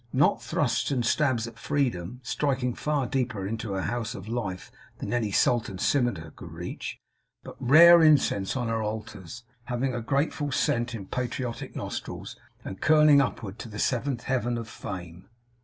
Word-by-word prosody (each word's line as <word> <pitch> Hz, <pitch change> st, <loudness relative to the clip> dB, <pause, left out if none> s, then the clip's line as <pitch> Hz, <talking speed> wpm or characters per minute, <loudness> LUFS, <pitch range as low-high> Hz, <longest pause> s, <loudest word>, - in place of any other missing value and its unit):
Not 140 Hz, +3 st, +3 dB
thrusts 120 Hz, -6 st, 0 dB
and 125 Hz, -4 st, 0 dB
stabs 130 Hz, -4 st, +2 dB
at 115 Hz, -2 st, -10 dB
Freedom, 125 Hz, -5 st, -1 dB
striking 130 Hz, -1 st, -1 dB
far 150 Hz, -1 st, -1 dB
deeper 125 Hz, -6 st, -2 dB
into 110 Hz, 0 st, -3 dB
her 95 Hz, -1 st, -2 dB
House 115 Hz, 0 st, -3 dB
of 95 Hz, +1 st, -8 dB
Life 110 Hz, -6 st, -4 dB, 0.3 s
than -, -, -4 dB
any 120 Hz, -3 st, 0 dB
sultan's 110 Hz, -3 st, +1 dB
scimitar 115 Hz, -, 0 dB
could -, -, -11 dB
reach; -, -, -6 dB, 0.5 s
but -, -, -10 dB
rare 170 Hz, +6 st, +8 dB
incense 135 Hz, -10 st, +3 dB
on 120 Hz, -2 st, -1 dB
her 115 Hz, 0 st, -1 dB
altars, 105 Hz, -1 st, -6 dB, 0.2 s
having 125 Hz, +1 st, -1 dB
a 120 Hz, -, -3 dB
grateful 145 Hz, +3 st, -1 dB
scent 120 Hz, -1 st, 0 dB
in 100 Hz, -4 st, -7 dB
patriotic 125 Hz, +2 st, -4 dB
nostrils, -, -, -6 dB, 0.3 s
and 95 Hz, -, -7 dB
curling 150 Hz, -2 st, +6 dB
upward 115 Hz, -5 st, -4 dB
to 115 Hz, -, -7 dB
the 105 Hz, -, -8 dB
seventh 125 Hz, +2 st, -1 dB
heaven 120 Hz, -2 st, 0 dB
of 115 Hz, -1 st, -5 dB
Fame. 90 Hz, -3 st, -8 dB
120 Hz, 160 wpm, -27 LUFS, 105-135 Hz, 0.5 s, rare